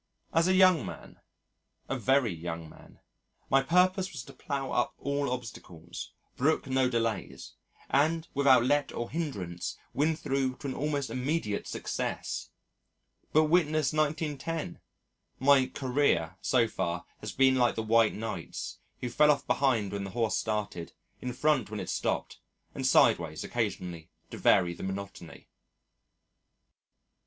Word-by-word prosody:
As 165 +2 +3
a 185 - +3
young 185 -7 +6
man 95 - -9 0.7
a - - -2
very 130 -2 +2
young 85 0 -6
man 80 - -17 0.5
my 135 - +5
purpose 185 +5 +2
was 135 -5 -6
to - - -13
plough 135 -3 -4
up 120 - 0
all 140 +1 -1
obstacles, 90 -9 -7 0.2
brook 155 +5 +1
no 130 -1 +2
delays, 115 -6 -2 0.3
and 160 +4 +2
without 135 -3 +5
let 145 +1 +2
or 120 - -4
hindrance 100 - -4 0.2
win 155 +4 +2
through 135 -4 -1
to - - -12
an - - -3
almost 145 -1 -2
immediate 130 -5 -2
success! - - -4 0.8
But 155 - +5
witness 155 -2 +2
1910! 155 - -2 0.6
"My 135 -1 +5
career" 125 - 0
so 120 -3 +3
far 85 -4 -3
has - - -6
been 135 0 +4
like 125 -2 +2
the 110 - -2
White 115 0 +3
Knight's, 105 -5 -5 0.2
who 125 - -2
fell 150 +5 +5
off 145 -1 +3
behind 115 -8 +1
when 100 -1 -3
the 95 - -5
horse 115 -2 +1
started, 105 -6 -3 0.3
in 125 - -3
front 145 +1 +1
when 105 -1 -5
it - - -5
stopped, - - -2 0.3
and 135 -1 -1
sideways 85 -11 +3
occasionally 90 -8 -3 0.2
to - - -7
vary 90 -3 +4
the - - -11
monotony. 95 -3 -7
130 Hz, 140 wpm, -29 LUFS, 105-145 Hz, 0.8 s, young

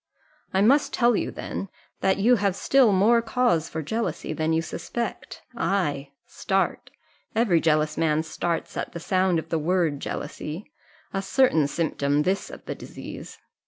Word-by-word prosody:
I 190 - +2
must 275 +8 +4
tell 240 -1 +3
you, - - -1
then, 195 - -5 0.3
that 190 0 +2
you 235 +5 +4
have 200 -2 +1
still 260 +1 +4
more 215 +5 +4
cause 230 -9 +1
for 160 0 -4
jealousy 180 -3 -2
than 155 +1 -1
you 160 0 +1
suspect. 235 +7 -5
Ay, 145 -8 -1 0.2
start 195 0 -1 0.5
every 210 -8 +3
jealous 155 -1 +1
man 155 -1 +2
starts 165 +1 -3
at - - -4
the 170 - -5
sound 185 0 +1
of 160 0 -4
the 165 - 0
word 165 -3 +1
jealousy 165 - -6 0.4
a 195 - -1
certain 195 - +3
symptom 145 -2 0
this 190 +3 -1
of - - -11
the - - -3
disease." - - -9
180 Hz, 160 wpm, -25 LUFS, 160-210 Hz, 0.5 s, must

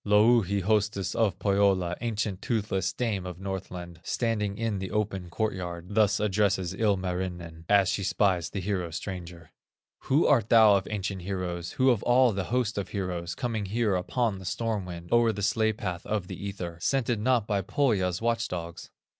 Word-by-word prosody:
Louhi, 105 -1 +4
hostess 105 0 0
of 105 -5 +1
Pohyola, 95 -3 +2
Ancient, 105 -5 -2
toothless 100 -5 -1
dame 105 -2 -2
of 90 -1 -7
Northland, 90 -3 -6
Standing 105 -1 -1
in 110 -3 -1
the 95 0 -4
open 100 -4 -2
court 110 +5 -1
yard, 90 -1 -6
Thus 105 -2 +3
addresses 100 -3 +1
Ilmarinen, 90 -5 -2
As 100 -2 +5
she 100 - 0
spies 95 -3 +1
the 100 - -4
hero 90 -3 -2
stranger: 85 -1 -7 0.5
"Who 145 +5 +3
art 120 -7 +3
thou 110 -3 +7
of 95 -1 -1
ancient 100 -2 -3
heroes, 90 -2 -4
Who 130 0 +4
of 115 -4 0
all 125 0 +4
the 95 -2 -2
host 120 -1 0
of 100 - -5
heroes, 90 -4 -3
Coming 115 -4 -2
here 110 0 +1
upon 105 +3 -1
the 95 - -10
storm 110 0 -2
wind, 85 -1 -8
O'er 120 -1 +4
the 100 -1 -5
sledge 110 +1 +1
path 90 -3 -4
of 105 -4 -1
the 100 - -6
ether, 85 -4 -6
Scented 120 -2 +1
not 120 -1 +2
by 100 -2 0
Pohya's 95 -4 0
watch 115 0 +1
dogs?" 85 -1 -6
100 Hz, 175 wpm, -28 LUFS, 90-110 Hz, 0.5 s, thou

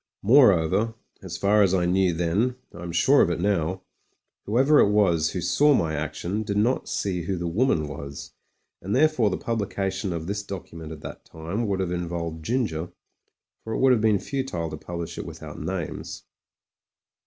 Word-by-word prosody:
Moreover, 110 - +4 0.3
as - - -6
far 105 +1 +3
as 95 -2 +4
I 90 -2 +1
knew 90 +1 +2
then 90 +9 0
— - - -36
I - - -9
am 85 -1 -5
sure 85 0 +4
of - - +3
it - - -1
now 95 -1 0 0.3
— - - -52
^whoever 135 +8 +4
it - - +2
was 90 -7 +2
who 90 - -2
saw 140 - +4
my 80 -7 0
action, 80 +7 -3
did 100 -1 -2
not 120 +5 +1
see 90 -3 -1
who 90 +3 -2
the 85 - -4
woman 85 - +1
was, 70 -1 -8 0.5
and 100 +5 -2
therefore 140 -6 +3
the 95 - -2
publication 100 -4 -2
of 85 -2 -4
this 100 +3 -3
document 85 -5 -8
at 80 -2 -9
that - - -9
time 85 +8 -4
would 95 -1 0
have 90 -2 -2
involved 85 -2 -4
Ginger, 90 -7 -1 0.7
for 110 - -5
it - - -1
would 130 0 +5
have 120 -4 +3
been 110 -2 +4
futile 95 - -3
to - - -4
publish 85 +1 -6
it - - -5
with - - -10
out - - -8
names. 85 0 -5
95 Hz, 190 wpm, -25 LUFS, 85-105 Hz, 0.7 s, would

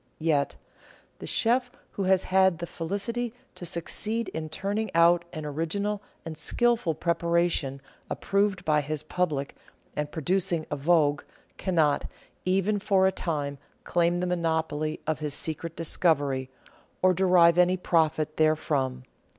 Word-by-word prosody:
Yet, 155 -3 +1 0.6
the - - -7
Chef 245 +2 +2 0.2
who 195 - -3
has 190 0 +3
had 190 -2 +3
the 170 - -4
felicity 215 +8 -3 0.2
to 175 - -7
succeed 215 +6 -1
in 160 -1 -5
turning 200 +6 -2
out 170 +1 +5
an 155 -2 -6
original 180 +8 -2 0.2
and 165 -1 -5
skilful 225 +2 +2
preparation 170 -5 0 0.3
approved 200 -2 0
by 150 -2 +3
his 150 +1 -3
public 155 -5 -2 0.4
and 150 0 -3
producing 170 +1 0
a - - 0
vogue, 145 -1 +2 0.4
cannot, 160 -6 +2 0.4
even 195 +3 +1
for 195 -1 +3
a 190 - +4
time, 145 -6 -3 0.2
claim 175 0 +1
the 180 - -1
monopoly 160 -3 -1
of 155 -1 -1
his 150 -2 -2
secret 160 +2 -2
discovery, 145 -6 +1 0.5
or 185 0 +6
derive 180 -2 +5
any 180 +1 +4
profit 155 -3 +1
therefrom. 145 -5 +1
170 Hz, 135 wpm, -27 LUFS, 155-190 Hz, 0.6 s, or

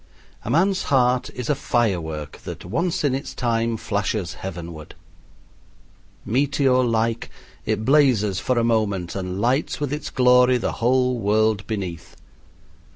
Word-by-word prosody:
A - - -6
man's 185 +4 +2
heart 125 -2 +2
is 125 -2 -5
a - - +3
firework 85 - -2
that - - -8
once 165 - -1
in 140 -3 +2
its 135 +1 -4
time 115 -2 0
flashes 100 -4 -2
heavenward. 85 -4 -8 1.3
Meteor 130 +1 +2
like, 115 -1 0 0.4
it 110 - -1
blazes 125 -9 +3
for 130 +4 0
a 120 - +2
moment 105 -7 0
and 95 -1 -4
lights 125 +7 0
with 145 -1 -2
its 150 -1 -4
glory 125 0 +4
the 120 - -2
whole 125 +1 +2
world 105 -1 +1
beneath. 90 -7 -5
115 Hz, 135 wpm, -22 LUFS, 100-130 Hz, 1.3 s, glory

